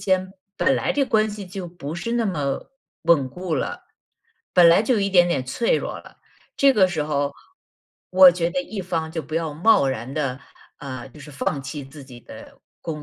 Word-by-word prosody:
间 185 Hz, -1 st, 0 dB, 0.3 s
本 265 Hz, -, +3 dB
来 -, -, 0 dB
这 290 Hz, -, +1 dB
关 215 Hz, -2 st, +2 dB
系 205 Hz, -2 st, -7 dB
就 185 Hz, 0 st, -7 dB
不 165 Hz, -3 st, -7 dB
是 230 Hz, +7 st, -4 dB
那 235 Hz, -2 st, +1 dB
么 145 Hz, -, -3 dB, 0.3 s
稳 160 Hz, -5 st, +4 dB
固 180 Hz, +3 st, -4 dB
了， 135 Hz, -, -4 dB, 0.7 s
本 175 Hz, -2 st, +7 dB
来 170 Hz, +5 st, +5 dB
就 240 Hz, -, +1 dB
有 215 Hz, -, +1 dB
一 200 Hz, -, +1 dB
点 175 Hz, -2 st, +5 dB
点 140 Hz, -7 st, 0 dB
脆 230 Hz, -, 0 dB
弱 -, -, -4 dB
了， -, -, -16 dB, 0.4 s
这 275 Hz, -1 st, +6 dB
个 190 Hz, -3 st, +5 dB
时 170 Hz, -4 st, -2 dB
候 145 Hz, -1 st, -1 dB, 0.8 s
我 185 Hz, 0 st, +9 dB
觉 170 Hz, -1 st, -1 dB
得 275 Hz, -, -1 dB
一 215 Hz, -8 st, -6 dB
方 165 Hz, -3 st, -3 dB
就 160 Hz, -2 st, -3 dB
不 155 Hz, -, -8 dB
要 160 Hz, -2 st, -2 dB
贸 165 Hz, -3 st, +4 dB
然 130 Hz, 0 st, -4 dB
地， 135 Hz, -4 st, -2 dB, 0.4 s
啊， 130 Hz, -2 st, -7 dB
就 130 Hz, -, -16 dB
是 150 Hz, -, -11 dB
放 140 Hz, 0 st, -3 dB
弃 140 Hz, +2 st, -6 dB
自 140 Hz, +1 st, -12 dB
己 125 Hz, -2 st, -13 dB
的 -, -, -11 dB, 0.4 s
工 -, -, -13 dB
170 Hz, 220 characters per minute, -23 LUFS, 145-190 Hz, 0.8 s, 我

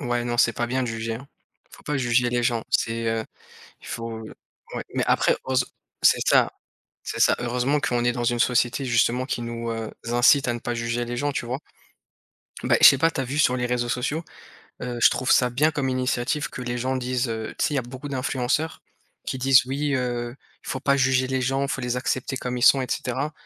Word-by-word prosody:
Ouais 120 Hz, 0 st, -1 dB
non, 120 Hz, 0 st, -2 dB
c'est 120 Hz, -1 st, +4 dB
pas 120 Hz, -, -2 dB
bien 130 Hz, +2 st, -1 dB
de 120 Hz, -, -2 dB
juger, 115 Hz, 0 st, -3 dB
hein. 140 Hz, +5 st, -10 dB, 0.4 s
Faut -, -, -15 dB
pas 150 Hz, -, -2 dB
juger 125 Hz, -1 st, +2 dB
les 120 Hz, 0 st, 0 dB
gens, 120 Hz, -2 st, +1 dB
c'est, 115 Hz, 0 st, 0 dB
heu 115 Hz, 0 st, -1 dB, 0.6 s
il -, -, -13 dB
faut, 115 Hz, -1 st, -5 dB
heu -, -, -10 dB, 0.4 s
ouais. -, -, -3 dB
Mais -, -, 0 dB
après -, -, +3 dB
heureuse 130 Hz, -1 st, +1 dB, 0.4 s
c'est -, -, +5 dB
ça, -, -, +4 dB, 0.5 s
c'est -, -, -5 dB
ça, -, -, +5 dB
heureusement 125 Hz, +4 st, 0 dB
qu'on 120 Hz, -3 st, 0 dB
est 120 Hz, -, +4 dB
dans 120 Hz, -1 st, -3 dB
une 120 Hz, 0 st, +1 dB
société, 125 Hz, +2 st, +2 dB
justement, 125 Hz, +1 st, +2 dB
qui 125 Hz, -, -3 dB
nous, 115 Hz, 0 st, -4 dB
heu, 115 Hz, -1 st, -4 dB, 0.2 s
incite 120 Hz, +3 st, +4 dB
à 120 Hz, -, +1 dB
ne 120 Hz, -, -5 dB
pas 120 Hz, -, -3 dB
juger 115 Hz, +1 st, -2 dB
les 120 Hz, +1 st, -4 dB
gens, 145 Hz, +3 st, 0 dB
tu 120 Hz, -, -3 dB
vois. 125 Hz, +3 st, -3 dB, 1.0 s
Bah -, -, +3 dB
et -, -, -3 dB
je -, -, +13 dB
sais 140 Hz, -, +2 dB
pas, 165 Hz, +3 st, +3 dB
tu 135 Hz, -, -2 dB
as -, -, -1 dB
vu 135 Hz, +3 st, -4 dB
sur 125 Hz, -5 st, +4 dB
les 125 Hz, -1 st, -1 dB
réseaux 125 Hz, 0 st, -1 dB
sociaux? 140 Hz, +7 st, -1 dB, 0.6 s
Heu, 125 Hz, -1 st, -4 dB
je -, -, +8 dB
trouve 130 Hz, -, -2 dB
ça 125 Hz, -, +4 dB
bien 150 Hz, +6 st, +2 dB
comme 140 Hz, -3 st, -1 dB
initiative 130 Hz, +3 st, -1 dB
que -, -, -8 dB
les 120 Hz, 0 st, -3 dB
gens 130 Hz, +2 st, -1 dB
disent, 125 Hz, 0 st, -1 dB
heu, 110 Hz, -1 st, -4 dB
tu -, -, +2 dB
sais, 150 Hz, -, -2 dB
il -, -, +1 dB
y -, -, +2 dB
a -, -, -8 dB
beaucoup 130 Hz, +4 st, -8 dB
d'influenceurs 135 Hz, +3 st, -1 dB, 0.4 s
qui 130 Hz, -, -3 dB
disent: 130 Hz, 0 st, +5 dB
«Oui, 140 Hz, +2 st, -1 dB
heu, 120 Hz, -1 st, -2 dB, 0.3 s
faut 130 Hz, -, -4 dB
pas 140 Hz, 0 st, +2 dB
juger 130 Hz, -1 st, +2 dB
les 130 Hz, 0 st, -1 dB
gens, 135 Hz, +2 st, 0 dB
faut 135 Hz, -, -2 dB
les 125 Hz, 0 st, -2 dB
accepter 130 Hz, +1 st, -2 dB
comme 125 Hz, 0 st, -3 dB
ils -, -, -5 dB
sont» 135 Hz, +1 st, +7 dB
et -, -, -3 dB
cetera. 135 Hz, +5 st, -2 dB
125 Hz, 240 wpm, -24 LUFS, 120-130 Hz, 1.0 s, je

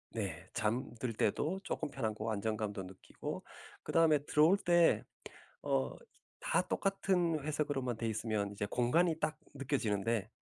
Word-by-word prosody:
네 95 Hz, -5 st, -4 dB
잠들 120 Hz, +2 st, -1 dB
때도 150 Hz, -, 0 dB
쪼끔 -, -, -2 dB
편하고 110 Hz, -2 st, -2 dB
안정감도 105 Hz, -1 st, -2 dB
느끼고 95 Hz, 0 st, -7 dB, 0.4 s
그다음에 160 Hz, -3 st, +4 dB
들어올 155 Hz, +7 st, +5 dB
때 175 Hz, -3 st, +4 dB, 0.6 s
어 65 Hz, -2 st, 0 dB, 0.5 s
다 -, -, +2 dB
똑같은 185 Hz, -4 st, +1 dB
회색으로만 145 Hz, -5 st, -1 dB
돼 115 Hz, -, -2 dB
있으면 110 Hz, -2 st, -1 dB
이제 100 Hz, 0 st, -3 dB
공간이 155 Hz, -, +2 dB
딱 155 Hz, 0 st, -1 dB, 0.2 s
느껴지는데 115 Hz, -6 st, 0 dB
120 Hz, 290 characters per minute, -34 LUFS, 105-155 Hz, 0.6 s, 들어올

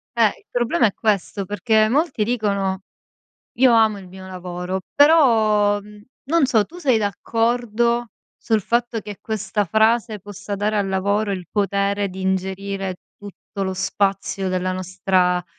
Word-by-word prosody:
Eh, 230 Hz, -2 st, +5 dB
il -, -, -8 dB
problema 245 Hz, +5 st, +2 dB
è 205 Hz, -, +1 dB
questo, 195 Hz, -3 st, -1 dB
perché 215 Hz, +2 st, +2 dB
molti 280 Hz, -3 st, +1 dB
dicono: 200 Hz, -4 st, -1 dB, 0.8 s
"Io 255 Hz, -1 st, +5 dB
amo 220 Hz, -2 st, +4 dB
il 190 Hz, -2 st, -11 dB
mio 190 Hz, +1 st, -11 dB
lavoro". 180 Hz, 0 st, -5 dB
Però, 220 Hz, -9 st, +4 dB
mhmm, 210 Hz, 0 st, -15 dB, 0.2 s
non 320 Hz, +1 st, +3 dB
so, 225 Hz, -5 st, +3 dB
tu 345 Hz, -, -14 dB
sei 260 Hz, -10 st, +2 dB
d'accordo 235 Hz, +3 st, 0 dB, 0.3 s
sul 220 Hz, -2 st, 0 dB
fatto 235 Hz, +2 st, 0 dB
che 210 Hz, -1 st, -9 dB
questa 215 Hz, -1 st, -2 dB
frase, 220 Hz, +3 st, +2 dB
possa 205 Hz, +1 st, -8 dB
dare 210 Hz, +2 st, 0 dB
al 200 Hz, -1 st, 0 dB
lavoro 200 Hz, +2 st, 0 dB
il 185 Hz, -3 st, -5 dB
potere 200 Hz, 0 st, 0 dB
di 190 Hz, +1 st, -8 dB
ingerire 190 Hz, 0 st, -2 dB, 0.2 s
tutto 200 Hz, 0 st, -7 dB
lo 190 Hz, 0 st, -2 dB
spazio 195 Hz, 0 st, -1 dB
della 185 Hz, 0 st, -1 dB
nostra 185 Hz, -1 st, 0 dB
205 Hz, 145 wpm, -21 LUFS, 190-225 Hz, 0.8 s, Eh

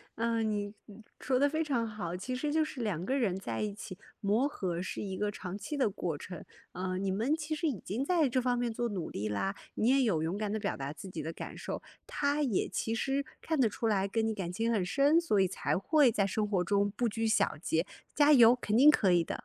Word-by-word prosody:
呃， 230 Hz, 0 st, 0 dB
你 205 Hz, -2 st, -2 dB
你 210 Hz, +1 st, -13 dB, 0.2 s
说 255 Hz, -1 st, +1 dB
得 285 Hz, -, +5 dB
非 315 Hz, +2 st, 0 dB
常 250 Hz, -7 st, 0 dB
好， 200 Hz, -6 st, -5 dB
其 255 Hz, +7 st, -4 dB
实 290 Hz, +4 st, -2 dB
就 315 Hz, +1 st, +2 dB
是 280 Hz, -4 st, -7 dB
2 185 Hz, -6 st, -2 dB
个 265 Hz, +5 st, 0 dB
人 195 Hz, -8 st, 0 dB
在 -, -, -4 dB
一 210 Hz, -1 st, -2 dB
起， 200 Hz, -2 st, -8 dB, 0.2 s
磨 215 Hz, +6 st, +2 dB
合 180 Hz, -10 st, -3 dB
是 185 Hz, -, -4 dB
一 190 Hz, -2 st, -4 dB
个 210 Hz, 0 st, -1 dB
长 185 Hz, -1 st, -6 dB
期 295 Hz, +8 st, -5 dB
的 260 Hz, -6 st, +2 dB
过 175 Hz, -5 st, -3 dB
程， 180 Hz, +2 st, -8 dB, 0.3 s
呃， 185 Hz, 0 st, -3 dB
你 195 Hz, +1 st, -1 dB
们 220 Hz, +9 st, +1 dB
其 310 Hz, 0 st, -3 dB
实 325 Hz, +2 st, -1 dB
已 255 Hz, -10 st, -2 dB
经 225 Hz, +7 st, -3 dB
在 325 Hz, 0 st, +3 dB
这 255 Hz, 0 st, +1 dB
方 245 Hz, -1 st, +1 dB
面 240 Hz, -1 st, 0 dB
做 240 Hz, +1 st, -1 dB
努 185 Hz, -6 st, -4 dB
力 105 Hz, +2 st, -3 dB
啦， 150 Hz, -, -1 dB, 0.2 s
你 220 Hz, -, +1 dB
也 270 Hz, +1 st, +4 dB
有 205 Hz, -11 st, +2 dB
勇 165 Hz, +5 st, -1 dB
敢 210 Hz, -1 st, -2 dB
地 220 Hz, -, -1 dB
表 -, -, -2 dB
达 135 Hz, +1 st, -4 dB
自 160 Hz, +5 st, -9 dB
己 165 Hz, -3 st, -5 dB
的 160 Hz, -, -3 dB
感 -, -, -8 dB
受， -, -, -5 dB, 0.2 s
他 285 Hz, +1 st, 0 dB
也 245 Hz, -10 st, +1 dB
其 225 Hz, -, -2 dB
实 270 Hz, +4 st, -1 dB, 0.2 s
看 320 Hz, -, -1 dB
得 250 Hz, -5 st, +4 dB
出 225 Hz, +2 st, -2 dB
来 200 Hz, -2 st, +1 dB
跟 220 Hz, +2 st, 0 dB
你 220 Hz, -, 0 dB
感 190 Hz, -5 st, -4 dB
情 225 Hz, +5 st, 0 dB
很 200 Hz, -5 st, +1 dB
深， 285 Hz, -, +4 dB
所 260 Hz, -12 st, +1 dB
以 190 Hz, -, +4 dB
才 185 Hz, -, -1 dB
会 280 Hz, -, +4 dB
在 200 Hz, -2 st, +1 dB
生 210 Hz, +2 st, 0 dB
活 200 Hz, -3 st, +1 dB
中 200 Hz, +2 st, +2 dB
不 235 Hz, +4 st, 0 dB
拘 225 Hz, +1 st, -2 dB
小 220 Hz, +1 st, +2 dB
节， 165 Hz, 0 st, 0 dB, 0.3 s
加 295 Hz, 0 st, +5 dB
油， 240 Hz, -3 st, +8 dB
肯 215 Hz, -3 st, -1 dB
定 280 Hz, +6 st, +8 dB
可 195 Hz, -10 st, +3 dB
以 175 Hz, -1 st, +4 dB
的， -, -, -4 dB
215 Hz, 270 characters per minute, -31 LUFS, 190-260 Hz, 0.3 s, 油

